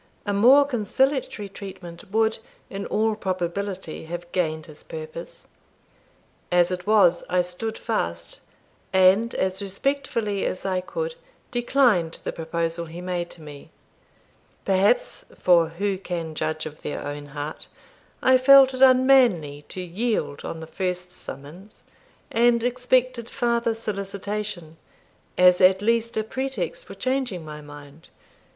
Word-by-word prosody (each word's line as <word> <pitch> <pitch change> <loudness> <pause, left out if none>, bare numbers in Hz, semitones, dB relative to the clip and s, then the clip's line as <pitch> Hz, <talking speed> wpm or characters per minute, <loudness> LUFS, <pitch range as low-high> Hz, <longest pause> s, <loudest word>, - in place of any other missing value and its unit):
A 205 - -1
more 255 +8 +6
conciliatory 260 -2 0
treatment 190 -3 -10
would, 220 +1 +1 0.3
in 200 0 -5
all 220 +1 +1
probability, 185 -3 -4
have 175 +1 -7
gained 160 -3 -1
his 155 - -14
purpose. - - -9 1.0
As 175 0 +4
it 180 0 -4
was, 190 -5 +4
I 180 0 +3
stood 180 +6 -4
fast, 85 - -3 0.5
and, 190 +5 +4
as 190 +1 -1
respectfully 210 -1 -2
as 185 - -3
I 185 -1 0
could, 485 - -4 0.4
declined 240 -9 +2
the - - -2
proposal 165 +1 -3
he 165 +2 -9
made 180 -1 -3
to 160 - -13
me. 145 -2 -11 1.0
Perhaps 200 - +2
for 170 -3 +4
who 190 +3 -2
can 170 -4 -4
judge 155 0 -2
of 155 -1 -9
their - - -5
own 145 0 -6
heart? 145 +2 -6 0.6
I 260 0 +6
felt 270 0 +7
it 255 - -5
unmanly 250 - +4
to 185 - -5
yield 180 -4 -2
on 165 - -6
the - - -6
first 180 +1 -3
summons, 170 +9 -11 0.5
and 235 0 +3
expected 250 -1 +1
farther 235 -2 0
solicitation, 200 -5 -5 0.6
as 180 0 +6
at 190 +2 +5
least 230 +1 +1
a 220 - +1
pretext 265 - -4
for - - -9
changing 255 -10 -2
my 150 0 -8
mind. 145 +1 -13
195 Hz, 130 wpm, -24 LUFS, 170-235 Hz, 1.0 s, felt